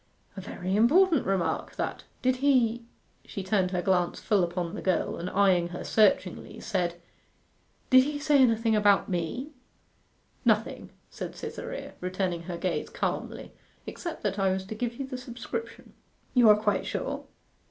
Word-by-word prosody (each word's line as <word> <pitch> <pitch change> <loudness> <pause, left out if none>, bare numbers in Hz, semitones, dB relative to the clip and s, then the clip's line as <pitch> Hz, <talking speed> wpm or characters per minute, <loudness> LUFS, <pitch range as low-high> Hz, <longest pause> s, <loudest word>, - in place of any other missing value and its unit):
'A 195 - -6
very 185 0 -3
important 310 - +4
remark, 190 -3 -1
that. - - -4 0.2
Did 255 0 +2
he 240 -4 +2 0.2
' - - -39
she 195 - -6
turned 190 -1 +1
her 180 -1 -2
glance 180 -3 +1
full 205 -4 +2
upon 175 0 -2
the 210 - -5
girl, 185 - 0
and 175 +2 -4
eyeing 185 -3 +3
her 175 +1 -7
searchingly, 210 0 +1
said 175 -6 -2 0.9
'Did 255 0 +8
he 295 0 -2
say 290 -1 +3
anything 230 -2 +3
about 205 -2 +4
me?' 185 - -3 0.9
'Nothing,' - - +1 0.2
said - - -6
Cytherea, - - -6
returning 180 -1 -2
her 175 - -3
gaze 180 0 -2
calmly, - - -4 0.3
'except 340 -2 -6
that 205 -1 -1
I 195 -1 +3
was 190 0 -2
to 200 - -6
give 235 +2 -3
you 275 - -4
the 260 -1 -6
subscription.' 250 - -7 0.4
'You 245 -4 +6
are 210 - +8
quite 210 -2 0
sure? - - -3
205 Hz, 160 wpm, -28 LUFS, 185-245 Hz, 0.9 s, Did